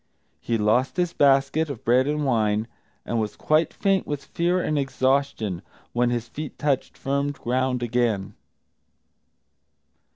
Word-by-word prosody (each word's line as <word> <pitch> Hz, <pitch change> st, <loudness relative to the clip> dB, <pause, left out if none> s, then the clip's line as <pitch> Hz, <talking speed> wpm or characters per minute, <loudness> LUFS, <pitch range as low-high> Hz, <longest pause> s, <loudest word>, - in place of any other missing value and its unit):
He 115 Hz, -, -1 dB
lost 110 Hz, +8 st, +1 dB
his 175 Hz, -1 st, 0 dB
basket 140 Hz, +3 st, +3 dB
of 135 Hz, -6 st, -7 dB
bread 125 Hz, +3 st, +4 dB
and 150 Hz, 0 st, 0 dB
wine, 110 Hz, -3 st, +1 dB, 0.4 s
and 115 Hz, -, -1 dB
was 105 Hz, -, -3 dB
quite 155 Hz, +1 st, +2 dB
faint 195 Hz, -1 st, 0 dB
with 145 Hz, -1 st, -4 dB
fear 175 Hz, +2 st, 0 dB
and 155 Hz, -, -1 dB
exhaustion 130 Hz, -8 st, 0 dB, 0.3 s
when 120 Hz, 0 st, +2 dB
his 120 Hz, -1 st, -2 dB
feet 150 Hz, +3 st, -7 dB
touched 140 Hz, -3 st, -1 dB
firm 140 Hz, +1 st, -1 dB
ground 125 Hz, -1 st, -1 dB
again. 115 Hz, -5 st, 0 dB
130 Hz, 135 wpm, -24 LUFS, 120-145 Hz, 0.4 s, bread